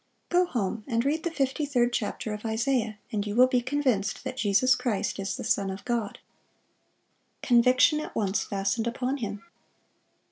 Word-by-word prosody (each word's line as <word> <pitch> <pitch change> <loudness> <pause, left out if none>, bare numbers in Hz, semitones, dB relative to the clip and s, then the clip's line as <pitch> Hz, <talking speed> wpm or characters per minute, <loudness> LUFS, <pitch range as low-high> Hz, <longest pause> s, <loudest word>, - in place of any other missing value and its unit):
Go 360 +1 +3
home 215 - -2
and 235 -1 0
read 305 +3 +1
the 340 - -1
fifty 280 -2 -1
third 245 -4 +1
chapter 215 -1 -2
of 210 - -7
Isaiah, 225 -1 0
and 210 -1 -2
you 205 - -3
will 250 +2 +7
be 255 -1 +1
convinced 255 -6 0
that - - -4
Jesus 240 +2 +3
Christ 235 -5 -2
is 195 0 -3
the - - -6
Son 200 -1 +1
of 190 +1 -7
God."(594) 235 -4 -2 1.3
Conviction 255 +4 +5
at 305 - -7
once 200 -2 0
fastened 200 +3 -1
upon 255 +3 -2
him. 210 -5 -5
235 Hz, 170 wpm, -27 LUFS, 210-260 Hz, 1.3 s, will